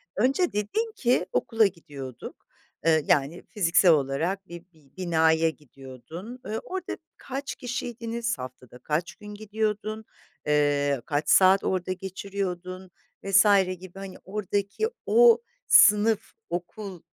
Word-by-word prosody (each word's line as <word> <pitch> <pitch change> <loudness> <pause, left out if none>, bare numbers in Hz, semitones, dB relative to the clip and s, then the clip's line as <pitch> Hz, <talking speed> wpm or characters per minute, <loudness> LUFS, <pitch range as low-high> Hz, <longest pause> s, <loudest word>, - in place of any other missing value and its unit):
Önce 270 - +2
dedin 425 - -1
ki 245 -1 +1
okula 225 -1 +2
gidiyorduk, 145 -8 -10 0.4
ııı, 160 -1 +4
yani 145 +5 +1
fiziksel 180 -3 +4
olarak 160 +7 0
bir 170 0 -10
bi 150 -4 -25
binaya 160 -2 +2
gidiyordun. 150 - -11
Iıı, 220 +1 -3
orada 375 -1 -5 0.2
kaç 275 +1 -6
kişiydiniz, 235 -2 -4
haftada 125 -1 -10
kaç 155 +6 -2
gün 210 - -13
gidiyordun, 215 +1 -3 0.4
ııı, 145 -2 +2
kaç 150 -1 -1
saat 190 +1 +6
orada 185 0 -1
geçiriyordun 185 -1 -5 0.3
vs. 195 0 +5 0.3
gibi 185 +1 -11
hani 195 -1 -8
oradaki 200 - -2 0.2
o 470 0 +6 0.3
sınıf, 210 +1 +5 0.2
okul, 180 +1 -6
185 Hz, 115 wpm, -26 LUFS, 160-215 Hz, 0.4 s, saat